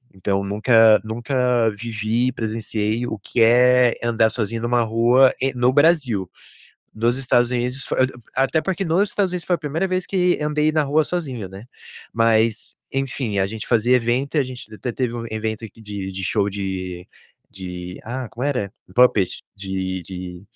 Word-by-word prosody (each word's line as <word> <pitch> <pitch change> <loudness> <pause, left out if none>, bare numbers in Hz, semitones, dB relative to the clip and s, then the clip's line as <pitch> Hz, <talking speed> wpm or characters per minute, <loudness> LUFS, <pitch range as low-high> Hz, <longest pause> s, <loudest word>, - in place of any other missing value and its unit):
Então, 100 +1 -1
nunca 110 +2 +5
nunca 120 +1 0
vivi 115 +2 -1
e - - +1
presenciei 110 0 -2
o 110 -3 -5
que 115 +4 -2
é 125 +1 +5
andar 115 -1 +2
sozinho 115 0 -2
numa 120 0 +2
rua 120 +4 +4
em 135 +1 0
no 125 +1 +3
Brasil. 140 - +2 0.7
Nos 120 +3 +1
Estados 120 -2 +2
Unidos, 125 +2 -1
fo - - -3
ah 130 - +3 0.4
até 160 +4 +1
porque, 190 0 -2
nos 190 +5 +1
Estados 195 -3 0
Unidos, 180 -2 -4
foi 180 - +2
a - - -1
primeira 160 +6 -1
vez 185 -1 -2
que 180 -2 +1
andei 150 +1 +1
na 155 0 +2
rua 150 +2 +2
sozinho, 135 - -4
né. 95 +3 -11 0.5
Mas, 115 -1 +1 0.2
enfim, 130 -6 -2
a 95 - +2
gente 110 +2 -7
fazia 120 +1 +3
evento 125 +5 -1
e - - +5
a - - +3
gente 125 -4 -9
até 125 - -4
teve 120 -1 -2
um 115 -1 -5
evento 110 0 -3
aqui 110 +2 -18
de 100 -2 -5
de 95 0 -5
show 100 +2 +1
de 95 -2 -5 0.4
de 90 -1 -8
ah, 125 +1 -5
como 120 +4 -5
era? 125 -9 -1 0.2
Puppet. 120 -7 +3
De 95 -1 -4
de 90 0 -8
115 Hz, 180 wpm, -21 LUFS, 105-130 Hz, 0.7 s, nunca